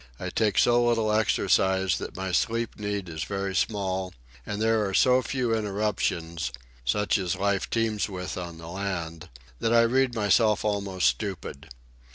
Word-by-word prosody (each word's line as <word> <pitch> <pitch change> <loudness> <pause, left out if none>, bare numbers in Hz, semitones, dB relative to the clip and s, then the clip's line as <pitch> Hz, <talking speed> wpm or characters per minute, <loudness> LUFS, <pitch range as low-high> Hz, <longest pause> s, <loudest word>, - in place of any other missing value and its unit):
I - - -4
take 110 -2 +1
so 120 0 +4
little 115 -2 +2
exercise 95 -3 +2
that - - -7
my 95 0 -3
sleep 115 +5 0
need 105 -2 -3
is 80 -2 -4
very 100 +2 -3
small; 95 -1 -1 0.3
and 105 -1 -3
there 110 0 +2
are 95 - -2
so 130 0 +5
few 125 -1 -1
interruptions, 95 - -2 0.3
such 105 - +1
as 90 -1 -1
life 100 0 0
teems 110 -2 0
with 90 -2 -5
on 85 -2 -6
the 80 0 -10
land, 85 -3 -4 0.3
that 115 - +1
I 115 - +7
read 130 +1 +2
myself 105 0 +3
almost 100 -3 -1
stupid. 80 +2 -3
100 Hz, 160 wpm, -26 LUFS, 90-110 Hz, 0.3 s, I